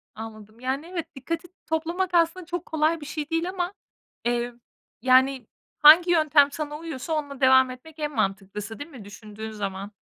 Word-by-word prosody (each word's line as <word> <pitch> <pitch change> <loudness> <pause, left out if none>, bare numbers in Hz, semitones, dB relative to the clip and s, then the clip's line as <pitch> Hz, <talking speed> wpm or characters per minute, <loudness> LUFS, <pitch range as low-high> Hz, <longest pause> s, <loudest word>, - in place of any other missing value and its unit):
Anladım. 215 0 -10
Yani 265 +5 -3
evet, 335 -4 -5
dikkati 330 +6 -4 0.2
toplamak 335 +4 -1
aslında 340 +1 +2
çok 350 0 -4
kolay 315 +1 +1
bir - - -7
şey 300 0 -5
değil 330 +2 0
ama, 365 0 -3 0.5
eee, 240 0 0 0.5
yani 260 -1 +4 0.3
hangi 330 +4 +8
yöntem 305 -3 +5
sana 295 0 -4
uyuyorsa 320 -2 -5
onunla 285 -3 -3
devam 260 0 +6
etmek 310 +5 -13
en 300 -1 -2
mantıklısı 200 +3 -3
değil 290 - -7
mi 250 -10 -11
düşündüğün 215 +1 -9
zaman? 200 -1 -5
290 Hz, 160 wpm, -25 LUFS, 235-330 Hz, 0.5 s, hangi